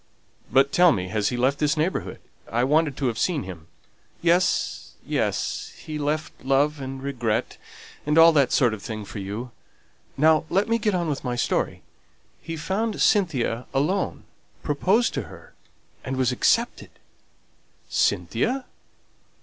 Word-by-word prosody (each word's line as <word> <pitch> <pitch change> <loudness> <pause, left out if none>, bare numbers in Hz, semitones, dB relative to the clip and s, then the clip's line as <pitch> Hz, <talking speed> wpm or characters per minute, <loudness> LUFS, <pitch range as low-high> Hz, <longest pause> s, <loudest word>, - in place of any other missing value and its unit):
"But 135 +3 +4
tell 175 +1 +6
me; 95 -7 -2
has 105 +1 0
he 125 - -3
left 130 +3 +1
this 150 0 +1
neighbourhood? 160 +5 -1 0.3
I 120 +3 +1
wanted 150 +1 +2
to 140 - -2
have 115 -3 -1
seen 170 -5 0
him." 85 -4 -9 0.5
"Yes, 175 +2 +1
yes. - - -2
He 155 -2 -6
left 150 +1 -3
love 140 +2 +2
and 135 0 -6
regret, 120 -6 -2 0.4
and 150 +2 0
all 165 0 +9
that 140 -5 +3
sort 120 -4 +3
of 105 - -6
thing 110 -1 -6
for 105 - -7
you. 105 +6 -5 0.7
Now 155 +2 +4
let 195 +2 +2
me 230 0 +1
get 210 -3 +1
on 175 -2 -1
with 145 -3 -3
my 125 -2 -2
story: 120 - -1 0.6
he 165 -1 -6
found 200 +7 -2
Cynthia 135 - +1
alone, 180 +8 0 0.4
proposed 190 +11 +2
to - - -1
her, - - -14 0.5
and 130 0 -3
was 130 -1 +2
accepted." 125 - +1 1.0
"Cynthia? 115 - 0
145 Hz, 150 wpm, -24 LUFS, 120-165 Hz, 1.0 s, all